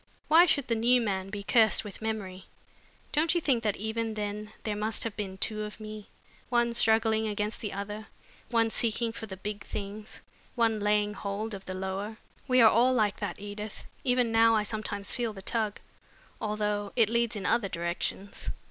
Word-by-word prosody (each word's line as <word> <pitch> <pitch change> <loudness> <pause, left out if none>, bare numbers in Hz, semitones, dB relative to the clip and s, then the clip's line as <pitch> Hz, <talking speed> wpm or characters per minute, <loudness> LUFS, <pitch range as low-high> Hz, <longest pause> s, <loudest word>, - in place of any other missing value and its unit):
"Why 335 +3 +8
should 285 -6 +2
the 230 - +1
new 240 +2 +4
man 195 -4 -1
be 200 0 -5
cursed 220 +1 +4
with 205 -1 -9
memory? 200 -4 -4 0.7
Don't 310 +3 +2
you - - +4
think 270 -7 +1
that 210 -3 0
even 220 +1 -2
then 210 0 -4
there 215 -2 -1
must 215 +1 0
have 225 -2 -4
been 195 -3 -4
two 215 +2 0
of 210 +1 -6
me, 215 -1 -8 0.4
one 240 -1 +2
struggling 220 -1 +3
against 210 +1 -2
the 210 - -3
other 205 +2 -5 0.4
one 230 -2 +2
seeking 230 0 0
for 225 0 -7
the 190 -2 -7
big 205 +1 -5
things, 210 +1 -6 0.3
one 225 -3 +2
laying 210 0 +2
hold 210 +2 -4
of 195 -1 -7
the 185 - -5
lower? 190 +3 -4 0.3
We 255 -1 +5
are 225 - +9
all 250 +3 +4
like 210 -4 +2
that, - - -4
Edith! 205 +1 -7 0.2
Even 250 -2 +2
now 225 0 +5
I 215 - +2
sometimes 210 -2 -3
feel 235 -3 -1
the 195 -2 -10
tug, 220 -2 -1 0.6
although 210 -1 -1
it 230 -3 +5
leads 235 0 +1
in 200 -3 -4
other 220 -5 +2
directions." 175 +3 -3
215 Hz, 185 wpm, -29 LUFS, 205-230 Hz, 0.7 s, are